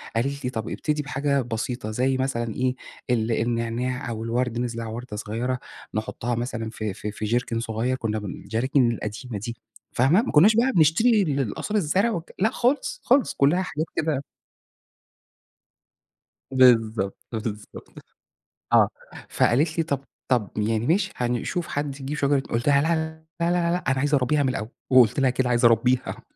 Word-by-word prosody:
قالت 140 +4 -1
لي - - 0
طب 110 -2 -4
ابتدي 150 -1 -1
بحاجة 140 0 0
بسيطة 115 -1 -4
زي 130 +3 +1
مثلًا 120 -4 -1
إيه 130 0 0 0.3
ال 115 -1 +1
النعناع 115 +2 -1
أو 110 -1 -4
الورد 120 0 -1
نزرع 115 -2 -3
وردة 115 -1 -6
صغيرة 120 +5 -2 0.3
نحطها 115 +2 -2
مثلًا 115 -2 -3
في 110 -3 -4
في 105 - -5
في 105 +1 -5
جيركن 115 +1 0
صغير 115 +3 -1
كنا 110 -3 -2
الجراكن 120 +5 0
القديمة 105 +1 -5
دي 115 +3 -6 0.4
فاهمة، 145 - +4
ما 260 - -3
كناش 200 +9 +6
بقى 250 +3 +3
بنشتري 200 +8 +4
القصاري 140 - -1
الزرع 190 +3 +1 0.2
لأ 215 +4 +3
خالص 285 - 0
خالص 260 +2 +3
كلها 150 +7 +3
حاجات 160 -3 -3
كده 150 -3 0 2.3
بالضبط، 115 -6 +4
بالضبط، 110 -2 -6 0.8
آه، - - +6 0.4
فقالت 155 +7 +2
لي: 165 - +2
"طب 140 -3 -2 0.3
طب 115 -6 +2
يعني 110 +2 0
ماشي 195 +5 +2
هنشوف 125 +8 -1
حد 145 -1 -3
يجيب 140 +3 -4
شجرة" 140 -1 +2
قلت 115 +3 -1
لها: 140 -1 +5
"لا، 165 +1 +2 0.5
لا، 170 - +2
لا، 175 -1 +1
لا، 175 -6 -1
أنا 135 - +1
عايز 145 +2 +1
أربيها 145 +2 +2
من 135 - +1
الأول،" 110 -3 -3 0.2
وقلت 130 0 +5
لها 130 -1 +4
كده 125 0 0
عايزة 120 -1 +5
أربيها. 125 +3 +1
125 Hz, 155 wpm, -24 LUFS, 115-145 Hz, 2.3 s, كناش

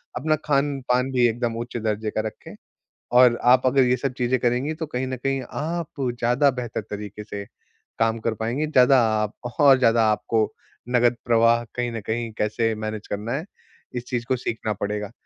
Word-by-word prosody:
अपना 155 +5 +1
खान-पान 135 -3 +1
भी 125 -2 +4
एकदम 115 0 -2
उच्च 120 +1 -5
दर्जे 110 -1 -2
का 110 - -1
रखें। 110 - -10 0.6
और 125 -1 +6
आप 125 +1 +5
अगर 135 +1 +4
ये 125 0 +2
सब 130 +1 -2
चीज़ें 125 +1 +1
करेंगी, 125 +6 0
तो 160 0 -5
कहीं 130 -3 -3
न 130 0 -3
कहीं 135 +1 -2
आप 165 -1 -4 0.2
ज़्यादा 125 +5 +3
बेहतर 125 -4 -4
तरीके 105 0 -6
से 100 -1 -6 0.5
काम 115 0 +1
कर 110 0 -1
पाएँगी, 120 +8 -2
ज़्यादा 130 -3 +5 0.2
आप 105 -1 -3 0.3
और 140 -2 +7
ज़्यादा 115 -2 +4
आपको 110 0 0 0.4
नगद 120 -1 +3
प्रवाह 115 0 +4
कहीं 120 -1 -1
न 115 - -4
कहीं 115 +1 -2
कैसे 110 +1 0
मैनेज 110 -1 -5
करना 105 +3 -3
है, 145 +5 -2 0.5
इस 120 -1 -4
चीज़ 120 -2 -2
को 130 - +2
सीखना 115 -3 -3
पड़ेगा। 105 0 -3
120 Hz, 180 wpm, -23 LUFS, 110-130 Hz, 0.6 s, और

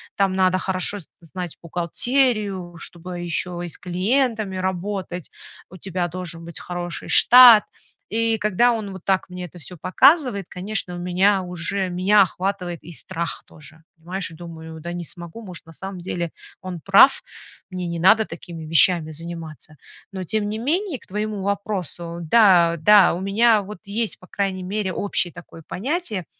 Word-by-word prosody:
Там 195 -1 +2
надо 185 -1 +2
хорошо 190 +2 0
з 160 - -14
знать 175 0 -7
бухгалтерию, 195 - 0
чтобы 175 +1 -8
ещё 175 0 -3
и - - -4
с - - -6
клиентами 215 +2 -1
работать. 185 -1 -4 0.4
У 185 - -12
тебя 180 -1 -3
должен 175 -2 -6
быть 170 - -7
хороший 175 -1 -6
штат". 245 -3 +8 0.5
И 225 0 +1
когда 210 +4 +3
он 215 -4 -3
вот 190 -2 -10
так 190 -1 0
мне 180 0 -8
это 175 +1 -13
всё 180 +3 -10
показывает, 205 - +3
конечно, 190 -1 -4
у - - -6
меня 185 +2 +2
уже 180 +2 -2
меня 195 +3 +4
охватывает 180 -2 -4
и 175 - -9
страх 170 +1 -5
тоже, 155 +1 -15
понимаешь? 180 +2 -6
Я 160 - -13
думаю: 160 -2 -9
"Да 175 +2 -5
не 175 0 -5
смогу, 175 +7 -8
может, 175 -3 -10
на 165 - -13
самом 190 +2 -7
деле 175 -1 -4 0.3
он 185 -2 -6
прав, 200 +8 +6 0.5
мне 185 -1 -4
не 170 0 -4
надо 215 +5 +5
такими 165 -2 -9
вещами 165 0 +4
заниматься". 160 -1 -8 0.4
Но 190 -1 -4
тем 205 +3 -1
не 215 - -3
менее, 330 - -1
к - - -21
твоему 210 0 -3
вопросу: 190 -4 -3
да, 180 -7 +5
да, 205 +3 +6
у 175 - -4
меня 215 +2 +3
вот 210 +2 -9
есть, 220 +2 -2
по - - -15
крайней 190 -2 -2
мере, 195 0 -2
общее 200 -3 -1
такое 165 - -12
понятие, 240 - -3
185 Hz, 165 wpm, -22 LUFS, 175-205 Hz, 0.5 s, штат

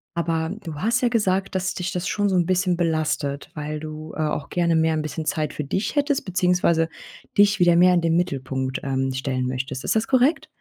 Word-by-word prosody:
Aber 165 0 -1
du 160 -3 -6
hast 230 - 0
ja 245 - +3
gesagt, 195 -4 0
dass 185 0 0
dich 180 +1 -3
das 180 0 -3
schon 205 -1 0
so 190 - +1
'n 175 - +3
bisschen 185 -1 +1
belastet, 155 -4 -1
weil 150 0 -4
du, 155 0 -7
äh, - - -1
auch 150 -2 -2
gerne 170 -2 +1
mehr 160 0 +2
'n 155 - 0
bisschen 155 +1 -4
Zeit 155 -1 -1
für 150 - -4
dich 190 - -2
hättest 285 -1 +1
beziehungsweise 180 -3 +2 0.5
dich 205 0 +5
wieder 175 -1 +5
mehr 180 +1 +6
in 175 - +3
den 165 0 +1
Mittelpunkt, 130 -5 -2
ähm, 135 -1 -1
stellen 130 -1 -2
möchtest. 130 +1 -4
Ist - - 0
das 220 - 0
korrekt? 260 +4 +2
170 Hz, 215 wpm, -23 LUFS, 150-185 Hz, 0.5 s, mehr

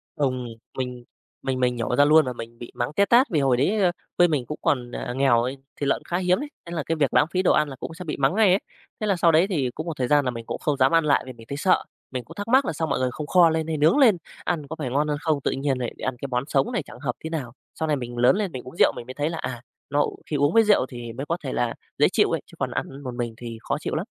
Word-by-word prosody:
Ừm, 130 -4 -1 0.3
mình 125 -2 -4 0.4
mình 130 -1 -2
mình 125 -1 +2
nhổ 120 +1 -1
ra 145 - +5
luôn 155 +1 +6
và 125 - -3
mình 115 0 -9
bị 120 - -9
mắng 120 +5 -2
té 200 - +4
tát 245 +6 +5
vì 155 - +1
hồi 130 -3 +3
đấy, 200 +11 +2
ơ, 180 - +4 0.3
quê 175 - +6
mình 145 -7 -1
cũng 150 - -5
còn, 125 -3 0
ờ, 120 - -4
nghèo 130 -3 +3
ấy, 130 +2 -3 0.2
thịt 140 - -1
lợn - - +3
cũng - - -22
khá 175 - -2
hiếm 180 0 +2
ấy, 290 +1 -5 0.2
thế 170 - -9
là 155 - -2
cái 165 - 0
việc 145 -4 +1
lãng - - +5
phí 185 - +1
đồ 185 - +3
ăn 150 - +2
là 135 - -7
cũng 160 - -7
sẽ 180 +2 -8
bị 155 - -3
mắng 140 +7 +2
ngay 215 -3 +5
ấy. 190 +3 +4 0.4
Thế 215 - 0
là 195 - +3
sau 170 -1 +4
đấy 165 +4 +4
thì 150 -10 0
cũng 155 - -5
một 160 - -4
thời 125 -2 0
gian 145 0 +3
là 125 - +1
mình 115 -1 -7
cũng - - -4
không 150 -2 0
dám 135 0 +4
ăn 165 -1 +4
lại 140 -2 +3
vì 130 - -8
mình 115 -1 -15
thấy 140 - -4
sợ, 185 +4 +3 0.3
mình 125 -2 -4
cũng 165 +8 -13
thắc 205 +1 -5
mắc 260 +3 +4
là - - -1
sao 160 +1 -2
mọi - - 0
người 130 -1 +1
không 150 +3 -6
kho 175 -1 +6
lên 160 0 -1
hay 160 - -1
nướng 155 - +4
lên 230 -10 +6 0.3
ăn 155 -5 -1
có 160 - -5
phải 135 - -2
ngon 145 +4 +1
hơn 150 -1 -1
không, 155 -3 0
tự - - 0
nhiên 135 0 -1
lại 120 - -3
ăn 130 -1 -2
cái 140 - -3
món 125 0 -1
sống 135 -3 +1
này - - -1
chẳng - - -13
hợp 125 -3 -2
tý 160 - -4
nào. 140 -8 -4 0.3
Sau 160 - 0
này 150 - +2
mình 120 -2 -6
lớn 125 +9 +5
lên 200 -4 -1
mình 130 - -6
uống 130 - -11
rượu - - +5
mình 120 - -7
mới 130 - -6
thấy 145 +3 -1
là, 165 - -4
à, 120 -6 -5 0.3
nó 145 +1 +2 0.2
khi 150 - -3
uống 145 +2 +2
với 225 0 +6
rượu 205 -10 +4
thì 120 -2 -7
mới 135 +4 -5
có 170 +3 -1
thể 130 - -3
là 120 -1 0 0.2
dễ - - +5
chịu - - +3
ấy, - - 0
chứ - - -17
còn - - -1
ăn 135 +1 -4
một 125 -2 -5
mình 120 -2 -3
thì 115 -2 -7
khó - - -2
chịu - - -3
lắm. - - -2
145 Hz, 325 wpm, -24 LUFS, 125-165 Hz, 0.4 s, luôn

